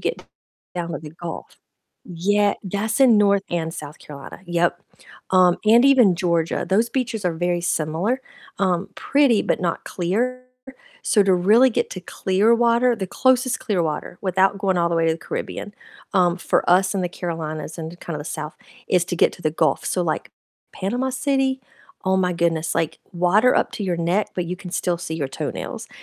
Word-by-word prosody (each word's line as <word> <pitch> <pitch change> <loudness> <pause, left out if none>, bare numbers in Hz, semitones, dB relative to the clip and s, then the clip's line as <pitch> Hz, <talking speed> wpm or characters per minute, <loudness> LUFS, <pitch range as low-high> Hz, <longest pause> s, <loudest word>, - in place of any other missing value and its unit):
get - - -3 0.5
down 170 -1 -3
to - - -3
the 150 -1 -9
Gulf 170 0 -8 0.5
yeah 200 +4 +1
that's 210 +5 -2
in 240 -5 +6
North 200 -1 +3
and 165 -1 -2
South 150 0 -8
Carolina. 140 +3 -11
Yep, 175 0 0 0.5
um, 180 -1 +5
and 235 +4 +6
even 250 -9 +6
Georgia, 170 -2 0
those 220 +5 +2
beaches 235 -6 -2
are 175 - +1
very 175 +1 -1
similar, 175 +10 -1 0.4
um, 185 0 +1
pretty 275 -6 +3
but - - 0
not 170 -2 -1
clear, 240 +9 -2 0.6
so 210 -5 +3
to 190 -2 +4
really 220 +9 +5
get - - -1
to 185 - -6
clear 195 +5 +1
water 235 +1 +3
the 190 - -3
closest 255 +2 +2
clear 190 -6 0
water 155 +2 -3
without 190 +1 +2
going 190 -2 +1
all 170 0 +2
the 170 - -1
way 165 0 +2
to 160 - +3
the 165 - -9
Caribbean, 205 - -6 0.4
um, 180 -2 +3
for 180 - 0
us 185 +2 +4
in 195 - 0
the 180 - -1
Carolinas 160 -3 -5
and 165 +2 -7
kinda 160 -3 -5
the - - -7
South, 150 -1 -6 0.3
is 180 -2 +3
to 175 - -3
get - - +3
to - - -15
the 155 - +1
Gulf, 155 -2 0
so, 180 - 0
like, 160 -3 -2 0.4
Panama 245 +7 -2
City, 265 0 0 0.4
oh 190 0 +2
my 180 -1 +1
goodness, 170 -2 0
like 165 - -1
water 190 +8 +3
up - - +1
to 210 - -5
your 175 -2 -1
neck, 175 +5 0
but 180 - -1
you 180 - -3
can 180 -1 -9
still 175 -1 -1
see 160 -2 -5
your 145 -4 -2
toenails, - - -5
185 Hz, 190 wpm, -22 LUFS, 170-215 Hz, 0.6 s, in